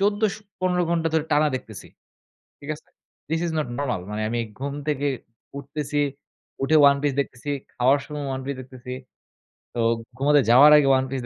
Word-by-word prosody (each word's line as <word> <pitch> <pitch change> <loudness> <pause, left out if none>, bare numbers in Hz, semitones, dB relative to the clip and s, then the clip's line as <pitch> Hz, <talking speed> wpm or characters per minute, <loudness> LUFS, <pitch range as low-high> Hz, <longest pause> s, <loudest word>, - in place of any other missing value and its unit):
১৪ 205 +1 +3
স 215 0 0
১৫ 185 -4 -2
ঘণ্টা 165 -1 +1
ধরে 160 -1 +2
টানা 150 +1 +4
দেখতেছি। - - -10 0.7
ঠিক 145 - -11
আছে? - - -19 0.4
This 165 +1 0
is 165 - -2
not 150 - -1
normal. 125 -10 -1
মানে 105 +1 -3
আমি 120 0 -1 0.2
ঘুম 140 +1 -3
থেকে 145 -1 0 0.5
উঠতেছি। 145 +1 -3 0.6
উঠে 155 +3 +3
'One 140 - +2
Piece' 140 -2 0
দেখতেছি, 130 +1 -7 0.2
খাওয়ার 130 +3 +3
সময় 150 -1 -6
'One 130 - -4
Piece' 140 -2 -4
দেখতেছি। 125 0 -9 0.8
তো 120 - -4 0.4
ঘুমাতে 145 +1 +4
যাওয়ার 140 +5 +8
আগে 140 -2 +4
'One 130 - 0
Piece' 130 -2 -4
145 Hz, 175 wpm, -24 LUFS, 130-155 Hz, 0.8 s, যাওয়ার